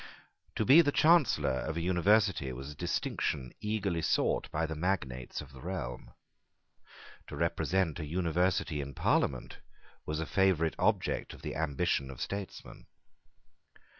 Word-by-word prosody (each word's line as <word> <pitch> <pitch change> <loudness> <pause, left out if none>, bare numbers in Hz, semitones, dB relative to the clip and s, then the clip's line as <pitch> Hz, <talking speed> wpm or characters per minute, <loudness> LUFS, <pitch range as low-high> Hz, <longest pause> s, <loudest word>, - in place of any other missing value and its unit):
To - - 0
be 145 +6 +8
the 145 -3 +1
Chancellor 150 - +3
of 80 +1 -4
an 85 - -2
University 90 -4 +2
was 65 +3 -7
a - - -11
distinction 75 -5 -2
eagerly 105 -5 -1
sought - - +1
by 80 +2 -1
the 80 - -4
magnates 75 -7 -2
of 70 -2 -12
the 65 - -12
realm. 65 -9 -6 1.1
To - - -7
represent 90 -3 0
an 75 - -4
University 85 -2 0
in 70 0 -7
Parliament 65 -3 0 0.5
was 75 0 -2
a 80 - -2
favourite 90 -4 +2
object - - 0
of - - -16
the - - -4
ambition 70 -3 0
of 65 -2 -9
statesmen. 100 -2 -6
80 Hz, 140 wpm, -31 LUFS, 70-95 Hz, 1.1 s, be